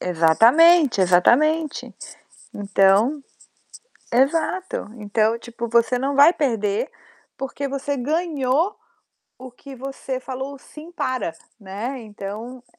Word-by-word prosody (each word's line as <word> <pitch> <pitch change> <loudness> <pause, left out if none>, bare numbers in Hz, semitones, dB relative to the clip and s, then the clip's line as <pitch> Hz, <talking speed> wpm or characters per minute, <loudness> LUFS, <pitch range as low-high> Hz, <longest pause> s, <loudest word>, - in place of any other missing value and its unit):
Exatamente, 235 - +4
exatamente. 285 - +2 0.6
Então 205 +7 +2 0.9
exato, 320 - 0
então 220 +1 0
tipo 235 0 -7
você 235 +2 +2
não 275 +2 -2
vai 290 +5 +7
perder, 225 - -1 0.5
porque 270 +1 -5
você 275 +1 -3
ganhou 305 - -1 0.6
o 260 0 -10
que 270 +2 -13
você 265 0 -6
falou 265 +2 -7
"Sim, 315 +5 -13
para", 255 - -3 0.3
né. 210 +7 -6
Então 220 +4 -8
255 Hz, 100 wpm, -22 LUFS, 215-285 Hz, 0.9 s, vai